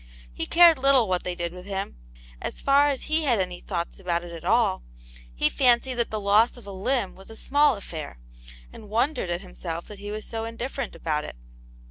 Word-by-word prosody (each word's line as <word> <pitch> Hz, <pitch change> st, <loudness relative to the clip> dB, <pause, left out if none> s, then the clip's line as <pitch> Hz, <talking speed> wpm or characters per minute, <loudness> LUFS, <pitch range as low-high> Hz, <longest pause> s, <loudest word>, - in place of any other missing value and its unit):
He -, -, -4 dB
cared 335 Hz, -4 st, +7 dB
little 265 Hz, -4 st, +4 dB
what 180 Hz, -1 st, 0 dB
they 180 Hz, -1 st, -3 dB
did 170 Hz, -1 st, -3 dB
with 180 Hz, +1 st, -10 dB
him; 195 Hz, 0 st, -4 dB, 0.5 s
as -, -, -4 dB
far 280 Hz, +1 st, +4 dB
as 275 Hz, -2 st, -2 dB
he 310 Hz, +1 st, +1 dB
had 240 Hz, -6 st, +3 dB
any 180 Hz, -1 st, -2 dB
thoughts 170 Hz, -2 st, -4 dB
about 175 Hz, -2 st, -1 dB
it 175 Hz, -, -9 dB
at 165 Hz, -1 st, -9 dB
all, 210 Hz, 0 st, +2 dB, 0.5 s
he -, -, +2 dB
fancied 255 Hz, 0 st, +3 dB
that 235 Hz, -1 st, -1 dB
the 215 Hz, -, -3 dB
loss 210 Hz, +4 st, +3 dB
of 240 Hz, -, -13 dB
a 200 Hz, -, -8 dB
limb 205 Hz, +2 st, -1 dB
was 190 Hz, +1 st, -13 dB
a 225 Hz, -, -9 dB
small 285 Hz, +3 st, +3 dB
affair, 160 Hz, -, -7 dB, 0.6 s
and 210 Hz, -, -12 dB
wondered 235 Hz, -, 0 dB
at 175 Hz, +1 st, -2 dB
himself 170 Hz, -3 st, -6 dB
that 210 Hz, -2 st, -9 dB
he 205 Hz, +1 st, -7 dB
was 215 Hz, +1 st, -5 dB
so 225 Hz, -1 st, -4 dB
indifferent 235 Hz, +3 st, -5 dB
about 150 Hz, -2 st, -1 dB
it. -, -, -8 dB
210 Hz, 210 wpm, -25 LUFS, 180-250 Hz, 0.6 s, cared